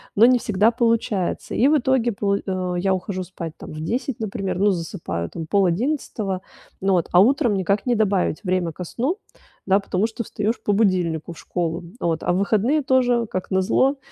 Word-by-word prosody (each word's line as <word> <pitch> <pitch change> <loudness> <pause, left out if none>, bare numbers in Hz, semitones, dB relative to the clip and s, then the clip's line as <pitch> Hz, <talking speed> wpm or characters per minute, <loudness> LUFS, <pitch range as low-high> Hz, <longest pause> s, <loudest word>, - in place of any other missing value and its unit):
но 220 - +7
не 250 0 +5
всегда 215 +2 +2
получается. 230 -6 0
И 255 - +4
в 305 - +5
итоге 255 -2 +1
пол 200 0 0
э, 185 -2 -3
я 190 +1 +2
ухожу 185 0 -4
спать, 170 -3 -7
там, - - -10
в 155 - -6
10, 240 - -2
например, 195 -4 -3
ну, 205 0 +4
засыпаю 165 - -4
там 165 - -6
в - - -9
10:30. 200 - 0 0.4
Ну 195 0 +2
вот, 175 -3 +1
а 175 - +7
утром 240 -1 +3
никак 195 +3 0
не 245 - +2
добавить 200 -6 +1
время 180 -3 0
ко 180 - -6
сну, 270 - -2 0.5
да, 195 +1 +4
потому 195 +2 0
что 230 +1 -5
встаёшь 215 +3 -2
по 205 - +1
будильнику 180 -6 +1
в - - -17
школу. 170 0 -3 0.2
Вот. 165 -1 -1
А - - +1
в 180 - +1
выходные 220 +9 +2
тоже 245 -3 +2
как 185 0 -5
назло, 225 +9 +2
200 Hz, 195 wpm, -22 LUFS, 180-230 Hz, 0.5 s, но